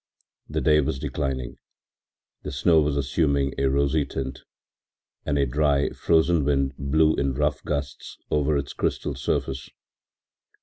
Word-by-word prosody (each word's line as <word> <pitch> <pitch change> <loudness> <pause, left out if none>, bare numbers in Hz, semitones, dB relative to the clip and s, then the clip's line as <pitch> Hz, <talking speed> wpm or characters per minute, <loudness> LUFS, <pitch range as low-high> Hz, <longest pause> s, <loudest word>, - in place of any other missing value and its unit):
The - - -2
day 75 -1 +4
was 70 -1 -2
declining, 65 -3 -3 0.8
the - - -6
snow 80 +4 +3
was 75 -1 0
assuming 70 -1 +1
a 70 - +2
rosy 70 +2 +2
tint, 65 -1 -5 0.9
and 70 - +1
a 70 - +3
dry, 70 +1 +1
frozen 80 -1 +2
wind 70 -1 +1
blew 75 +3 +2
in 70 -2 -1
rough - - 0
gusts 70 -3 -4
over 75 0 +2
its 70 -1 -4
crystal - - -2
surface. 65 0 -2
70 Hz, 135 wpm, -25 LUFS, 70-75 Hz, 0.9 s, day